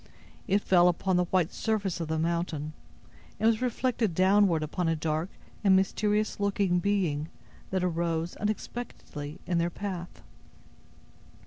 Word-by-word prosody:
It 200 Hz, +2 st, +2 dB
fell 180 Hz, -1 st, +5 dB
upon 180 Hz, +2 st, +1 dB
the 180 Hz, 0 st, +3 dB
white 175 Hz, -2 st, +1 dB
surface 205 Hz, -6 st, -1 dB
of 165 Hz, -, -3 dB
the 160 Hz, 0 st, -1 dB
mountain, 160 Hz, -2 st, -1 dB, 0.7 s
and 220 Hz, -, 0 dB
was 225 Hz, 0 st, +3 dB
reflected 240 Hz, -5 st, 0 dB
downward 185 Hz, -3 st, +4 dB
upon 165 Hz, +3 st, -2 dB
a 165 Hz, -, +2 dB
dark 155 Hz, +2 st, -1 dB, 0.3 s
and 195 Hz, -2 st, +6 dB
mysterious 210 Hz, +3 st, +1 dB
looking 200 Hz, -3 st, +1 dB
being 175 Hz, -6 st, 0 dB, 0.4 s
that 185 Hz, -1 st, 0 dB
arose, 170 Hz, -1 st, -1 dB
unexpectedly, 210 Hz, -8 st, -5 dB
in 175 Hz, -2 st, +1 dB
their 170 Hz, +1 st, +1 dB
path. 180 Hz, -1 st, -6 dB
180 Hz, 135 wpm, -29 LUFS, 165-205 Hz, 0.7 s, and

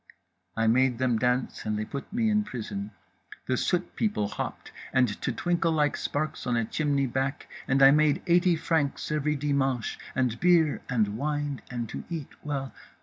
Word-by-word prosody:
"I 115 Hz, -, +2 dB
made 125 Hz, +2 st, +3 dB
them 125 Hz, -3 st, +1 dB
dance 125 Hz, +1 st, 0 dB
and 105 Hz, -1 st, -1 dB
they 110 Hz, -, -2 dB
put 140 Hz, +5 st, -7 dB
me 230 Hz, +1 st, +1 dB
in 210 Hz, 0 st, +3 dB
prison. 105 Hz, -, -5 dB, 0.6 s
The 130 Hz, -, +1 dB
soot 180 Hz, +7 st, -1 dB
people 205 Hz, -, 0 dB
hopped; -, -, -5 dB, 0.2 s
and 130 Hz, -1 st, +4 dB
to -, -, 0 dB
twinkle 170 Hz, +5 st, 0 dB
like 150 Hz, -2 st, +2 dB
sparks 150 Hz, -2 st, -3 dB
on 120 Hz, -1 st, +1 dB
a 115 Hz, -, +1 dB
chimney 140 Hz, +2 st, 0 dB
back 135 Hz, +2 st, -2 dB, 0.2 s
and 135 Hz, 0 st, +4 dB
I 135 Hz, -, +9 dB
made 150 Hz, 0 st, +3 dB
eighty 175 Hz, 0 st, +4 dB
francs 160 Hz, -4 st, -1 dB
every 150 Hz, 0 st, +1 dB
dimanche, 135 Hz, -4 st, 0 dB, 0.2 s
and 125 Hz, -3 st, 0 dB
beer 170 Hz, -4 st, +4 dB
and 110 Hz, -4 st, +1 dB
wine, 145 Hz, -1 st, -2 dB
and 120 Hz, -2 st, -3 dB
to -, -, -6 dB
eat 160 Hz, -5 st, -4 dB
well. 140 Hz, -3 st, -3 dB
140 Hz, 175 wpm, -27 LUFS, 125-155 Hz, 0.6 s, I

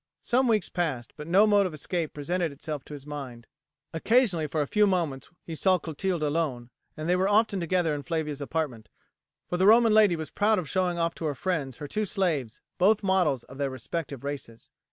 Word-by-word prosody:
Some 255 Hz, +2 st, +2 dB
weeks 215 Hz, -4 st, +2 dB
passed, 150 Hz, -10 st, -3 dB
but 150 Hz, -, -8 dB
no 190 Hz, +5 st, +5 dB
mode 205 Hz, -2 st, +4 dB
of 165 Hz, -, -7 dB
escape 165 Hz, +2 st, -2 dB
presented 170 Hz, +3 st, -1 dB
itself 145 Hz, 0 st, -6 dB
to -, -, -10 dB
his 140 Hz, -2 st, -9 dB
mind. 135 Hz, -6 st, -7 dB, 0.5 s
Occasionally 180 Hz, -2 st, +2 dB
for 150 Hz, 0 st, 0 dB
a -, -, -4 dB
few 210 Hz, +8 st, +3 dB
moments 165 Hz, -9 st, -1 dB
he 165 Hz, -, -7 dB
saw 185 Hz, +3 st, +3 dB
Clotilde 170 Hz, +1 st, -3 dB
alone, 145 Hz, -6 st, -1 dB, 0.3 s
and 155 Hz, +1 st, -4 dB
they 180 Hz, -, +3 dB
were 190 Hz, +2 st, +1 dB
often 205 Hz, -1 st, +3 dB
together 170 Hz, -2 st, +1 dB
in 145 Hz, -, -3 dB
Flavia's 150 Hz, 0 st, -3 dB
apartment, 140 Hz, -5 st, -3 dB, 0.6 s
for 175 Hz, -, -2 dB
the 190 Hz, +2 st, +3 dB
Roman 225 Hz, 0 st, +6 dB
lady 210 Hz, -5 st, +5 dB
was 160 Hz, -1 st, -6 dB
proud 215 Hz, +1 st, +2 dB
of 180 Hz, -5 st, -3 dB
showing 180 Hz, +1 st, 0 dB
off 165 Hz, 0 st, 0 dB
to 165 Hz, -, -6 dB
her 145 Hz, -2 st, -1 dB
friends 145 Hz, -7 st, -2 dB
her 145 Hz, -, -6 dB
two 215 Hz, +8 st, -1 dB
slaves, 160 Hz, -, -1 dB, 0.2 s
both 205 Hz, +3 st, +4 dB
models 180 Hz, -10 st, +2 dB
of 135 Hz, +2 st, -13 dB
their 140 Hz, -1 st, 0 dB
respective 135 Hz, +2 st, -5 dB
races. 140 Hz, -5 st, -7 dB
165 Hz, 205 wpm, -27 LUFS, 145-190 Hz, 0.6 s, Roman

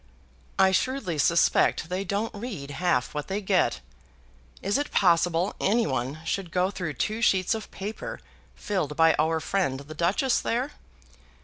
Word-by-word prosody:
"I 190 Hz, 0 st, +5 dB
shrewdly 190 Hz, -, -1 dB
suspect 165 Hz, 0 st, +3 dB
they 185 Hz, +2 st, -2 dB
don't 200 Hz, +4 st, -2 dB
read 200 Hz, -, -6 dB
half 145 Hz, -4 st, 0 dB
what 150 Hz, -1 st, -4 dB
they 195 Hz, +1 st, -2 dB
get. 190 Hz, -, +1 dB, 0.8 s
Is 205 Hz, +7 st, +1 dB
it 290 Hz, -, -2 dB
possible 175 Hz, 0 st, +2 dB
any 230 Hz, +4 st, +2 dB
one 135 Hz, +2 st, -2 dB
should 190 Hz, 0 st, -2 dB
go 185 Hz, +2 st, +1 dB
through 175 Hz, -6 st, -4 dB
two 215 Hz, -, -2 dB
sheets 190 Hz, -3 st, +3 dB
of 220 Hz, -1 st, -5 dB
paper 205 Hz, +3 st, -6 dB, 0.4 s
filled 180 Hz, -8 st, -2 dB
by 165 Hz, 0 st, +6 dB
our 160 Hz, +1 st, +2 dB
friend 155 Hz, -7 st, -1 dB
the 150 Hz, +2 st, -10 dB
Duchess 185 Hz, -, +1 dB
there? 250 Hz, +5 st, -1 dB
185 Hz, 150 wpm, -26 LUFS, 160-205 Hz, 0.8 s, by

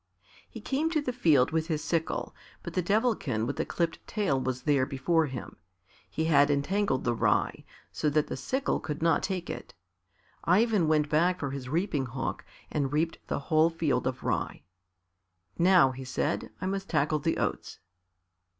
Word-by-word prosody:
He -, -, -9 dB
came 295 Hz, +4 st, 0 dB
to 325 Hz, -2 st, +1 dB
the 255 Hz, -4 st, -2 dB
field 155 Hz, -, +3 dB
with 160 Hz, 0 st, 0 dB
his 155 Hz, -3 st, -2 dB
sickle, 165 Hz, -1 st, -1 dB, 0.3 s
but -, -, -6 dB
the 180 Hz, -, +1 dB
Devilkin 205 Hz, -, +1 dB
with 140 Hz, -, -3 dB
the -, -, -1 dB
clipped 170 Hz, -1 st, -1 dB
tail 195 Hz, -11 st, 0 dB
was 130 Hz, 0 st, -3 dB
there 140 Hz, -3 st, +2 dB
before 155 Hz, +4 st, +1 dB
him. 130 Hz, -2 st, -7 dB, 0.5 s
He 160 Hz, -, -2 dB
had 145 Hz, -3 st, +5 dB
entangled 145 Hz, +2 st, +1 dB
the 120 Hz, -, +1 dB
rye, 115 Hz, -, +1 dB, 0.3 s
so 150 Hz, -, 0 dB
that 150 Hz, +1 st, +2 dB
the -, -, -5 dB
sickle 265 Hz, +1 st, -1 dB
could 150 Hz, +1 st, -5 dB
not 165 Hz, -1 st, +3 dB
take 185 Hz, -3 st, -3 dB
it. -, -, -7 dB, 0.7 s
Ivan 200 Hz, -1 st, +3 dB
went 155 Hz, -1 st, +3 dB
back 175 Hz, +5 st, +2 dB
for 140 Hz, -3 st, -3 dB
his 135 Hz, -2 st, -6 dB
reaping 155 Hz, -4 st, 0 dB
hook 130 Hz, +2 st, -4 dB, 0.3 s
and 140 Hz, -3 st, -1 dB
reaped 160 Hz, +3 st, 0 dB
the -, -, -1 dB
whole 155 Hz, +3 st, +3 dB
field 150 Hz, -7 st, 0 dB
of 130 Hz, -, -4 dB
rye. -, -, -2 dB, 1.0 s
"Now," 175 Hz, -6 st, +6 dB
he 130 Hz, +1 st, -8 dB
said, 140 Hz, +4 st, -2 dB
"I -, -, -4 dB
must 195 Hz, +1 st, -3 dB
tackle 150 Hz, -1 st, +1 dB
the 165 Hz, +3 st, 0 dB
oats." -, -, -3 dB
155 Hz, 175 wpm, -29 LUFS, 140-180 Hz, 1.0 s, Now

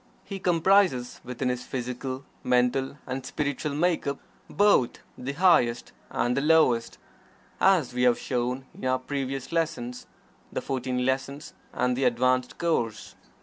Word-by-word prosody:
He 195 Hz, -1 st, -6 dB
comprises 175 Hz, -7 st, +2 dB
within 125 Hz, +1 st, -3 dB
his 125 Hz, 0 st, -2 dB
physical, 130 Hz, +2 st, -5 dB, 0.2 s
mental 125 Hz, +2 st, +1 dB
and 130 Hz, 0 st, -4 dB
spiritual 145 Hz, +1 st, -2 dB
make 170 Hz, +1 st, +1 dB
up 140 Hz, 0 st, -1 dB, 0.3 s
both 205 Hz, -12 st, +4 dB, 0.2 s
the 130 Hz, +3 st, -5 dB
highest 145 Hz, -8 st, +3 dB, 0.2 s
and 120 Hz, +1 st, 0 dB
the 140 Hz, -, +1 dB
lowest, 150 Hz, -7 st, +3 dB, 0.6 s
as 180 Hz, -10 st, +3 dB
we 125 Hz, -, -1 dB
have 125 Hz, -1 st, +4 dB
shown 125 Hz, +1 st, -2 dB
in -, -, -13 dB
our 130 Hz, 0 st, +2 dB
previous 135 Hz, 0 st, -4 dB
lessons 125 Hz, -7 st, -2 dB, 0.4 s
(the -, -, -2 dB
"Fourteen 125 Hz, -1 st, -2 dB
Lessons" 135 Hz, +3 st, -2 dB, 0.2 s
and 125 Hz, 0 st, 0 dB
the 135 Hz, +1 st, 0 dB
"Advanced 125 Hz, +1 st, +1 dB
Course"). 115 Hz, -, -1 dB
130 Hz, 140 wpm, -27 LUFS, 125-150 Hz, 0.6 s, both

